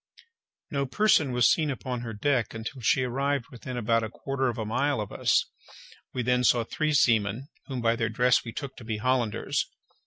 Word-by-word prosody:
No 140 -1 -1
person 160 -4 +3
was 125 -1 +4
seen 155 -2 +2
upon 130 -2 -4
her 120 -2 -5
decks 115 +1 0
until 125 +4 -6
she 130 +3 +3
arrived 135 +1 -1
within 125 +1 -7
about 115 0 +2
a 110 - -3
quarter 135 +3 -2
of 120 -1 -2
a 110 - -3
mile 140 +4 0
of 105 - -4
us. - - +2 0.7
We 125 - -2
then 125 +1 +2
saw 120 -1 +4
three 155 +6 -1
seamen, 115 0 +2 0.2
whom 130 -3 -4
by 115 0 +2
their 115 -1 -1
dress 125 +3 +3
we 115 - -6
took 140 +2 -6
to 125 - -10
be 110 -1 -3
Hollanders. 120 -1 0
125 Hz, 195 wpm, -27 LUFS, 115-135 Hz, 0.7 s, was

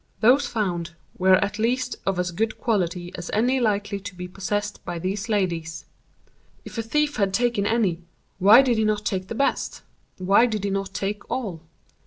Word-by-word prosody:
Those 255 +6 +4
found 175 -6 -2 0.2
were 185 0 +6
at 205 +1 -6
least 250 +3 0
of 195 -2 +1
as 180 0 -1
good 215 +5 -1
quality 180 -6 -1
as 175 - -7
any 250 +5 +2
likely 205 -3 0
to 195 -1 -8
be 180 0 -6
possessed 205 +3 -3
by 175 - -4
these 195 +5 -3
ladies. 170 -6 -1 0.8
If - - -6
a - - +2
thief 295 +6 0
had 195 -2 +1
taken 235 -3 +1
any, 200 -7 +1 0.4
why 210 +7 +8
did 240 -4 +1
he - - +2
not 210 -1 0
take 190 -2 -2
the 230 - -5
best—why 210 -5 0
did 215 -4 -3
he 200 - -1
not 195 0 -3
take 200 +1 -3
all? 195 -11 -3
205 Hz, 180 wpm, -24 LUFS, 185-225 Hz, 0.8 s, why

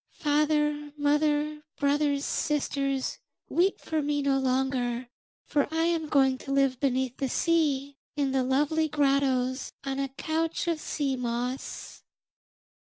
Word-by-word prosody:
Father, 295 0 +1
mother, 295 +1 +1 0.2
brothers, 285 0 +1
sisters, 275 -3 -1 0.3
weep 370 +3 +2
for 315 -1 -2
me 290 0 0
no 275 -1 +2
longer, 255 -2 0 0.4
for 285 0 0
I 325 +1 +1
am 330 -2 0
going 265 -3 +3
to 275 - -7
live 275 -2 +2
beneath 260 -2 0
the 270 - -1
sea, 285 -3 +1 0.2
in 280 -2 0
the 265 0 +2
lovely 295 +5 +2
grottos, 270 -3 +1
on 270 0 -3
a 275 0 -1
couch 320 +5 -2
of 335 -2 0
sea 280 -3 -1
moss.' 245 +1 -4
280 Hz, 130 wpm, -28 LUFS, 265-300 Hz, 0.4 s, going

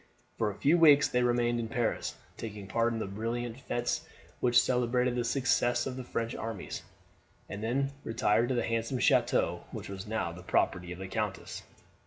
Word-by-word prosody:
For 110 - +2
a 100 - -6
few 155 +10 +3
weeks 145 -3 +7
they 125 - +1
remained 120 -1 +2
in 115 - -2
Paris, 120 -1 -1 0.2
taking 105 -3 -7
part 115 +4 +1
in 115 - -2
the 110 - -2
brilliant 115 +4 -3
fetes 120 -2 -1 0.4
which 120 -1 +5
celebrated 125 0 +2
the 120 - 0
success 120 -1 +2
of 130 - -4
the 130 - -5
French 115 -1 -3
arms, 110 -3 -5 0.7
and 100 - -6
they - - -1
then 135 +3 0
retired 115 +1 +2
to 130 - +1
the 120 - +1
handsome 115 +3 -1
chateau - - +2
which - - -7
was 95 +1 -7
now 110 -5 -1
the 90 +2 -10
property 90 0 0
of 90 - -6
the 95 +1 -6
countess. 105 0 -3
115 Hz, 190 wpm, -30 LUFS, 110-125 Hz, 0.7 s, weeks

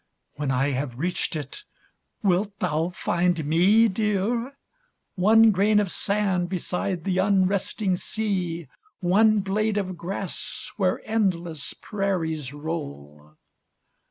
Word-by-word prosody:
When 145 -1 -3
I 135 +2 +1
have 130 -2 -3
reached 175 +3 -1
it, 150 - -6 0.6
wilt 200 +1 +1
thou 160 +1 0
find 175 -2 0
me, 190 +9 +5
dear? 220 +5 -1 0.6
One 220 +4 +6
grain 210 +2 +3
of 200 -4 0
sand 195 -4 0
beside 180 -1 -2
the 185 -1 0
unresting 195 0 +1
sea 180 -7 -2 0.2
— 425 -3 -36
One 210 +4 +4
blade 210 +2 0
of 185 -3 -2
grass 190 +2 -5
where 190 -3 0
endless 175 - -1
prairies 165 - -2
roll 75 - -7
185 Hz, 115 wpm, -25 LUFS, 165-205 Hz, 0.6 s, One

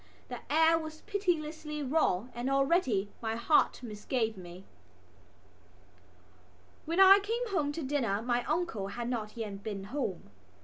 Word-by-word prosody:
The - - -5
air 320 +2 +5
was 315 -1 -8
pitilessly 315 -7 -2
raw 255 - +1
and 240 +3 -3
already 275 - +2
my 225 -1 -2
heart 250 +2 +2
misgave 220 +1 -2
me. 180 0 -11 2.2
When 335 +4 -1
I 390 +1 +9
came 455 +4 -2
home 300 -8 0
to 320 - -4
dinner 260 -8 0
my 240 0 0
uncle 310 - -1
had 235 +4 -5
not 220 -3 -4
yet 205 -3 -5
been 200 -2 -5
home. 195 - -3
270 Hz, 135 wpm, -31 LUFS, 220-320 Hz, 2.2 s, I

